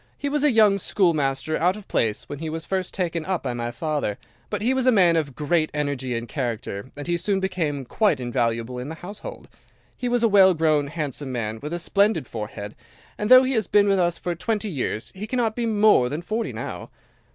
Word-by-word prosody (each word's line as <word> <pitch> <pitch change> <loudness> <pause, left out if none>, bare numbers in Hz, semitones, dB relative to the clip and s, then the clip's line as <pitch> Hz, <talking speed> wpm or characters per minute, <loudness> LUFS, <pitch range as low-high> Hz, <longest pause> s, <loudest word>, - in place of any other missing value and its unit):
He 285 - -2
was 295 0 0
a 300 - +6
young 215 -5 +4
schoolmaster 155 -6 +1
out 180 +4 +2
of 210 -2 -11
place 110 -2 0
when 145 - -7
he 160 0 -4
was 160 +1 -5
first 190 -1 -2
taken 170 -3 -2
up 185 +1 -2
by 125 -3 -2
my 120 0 -3
father, 145 -5 -2 0.3
but - - -3
he 250 +3 +2
was 260 -1 0
a - - +7
man 180 -7 +5
of 145 -5 -1
great 155 +1 +1
energy 140 -4 -2
and 115 +1 -5
character, 120 -4 -4
and 145 - -6
he 175 0 0
soon 195 +3 0
became 165 -8 -2
quite 205 - +1
invaluable 120 0 -1
in 125 +3 -6
the 160 - -6
household. 205 +3 -8 0.5
He 245 - -3
was 240 -1 +1
a - - +6
well 190 -3 +6
grown, 155 -3 +2
handsome 145 -3 -4
man, 110 -3 -3
with 150 - -5
a 175 - -1
splendid 200 -1 +1
forehead, 105 -2 -6 0.4
and 210 - -3
though 255 +1 +9
he 260 +1 0
has 220 -6 0
been 205 -1 +4
with 195 -1 +3
us 175 -1 +1
for 175 - -3
twenty 210 +4 -2
years 125 -6 -3
he 200 +3 -6
cannot 230 -2 0
be 235 -1 -1
more 210 - +4
than 150 +5 -4
forty 220 +5 -2
now. - - -6
170 Hz, 220 wpm, -24 LUFS, 135-205 Hz, 0.5 s, though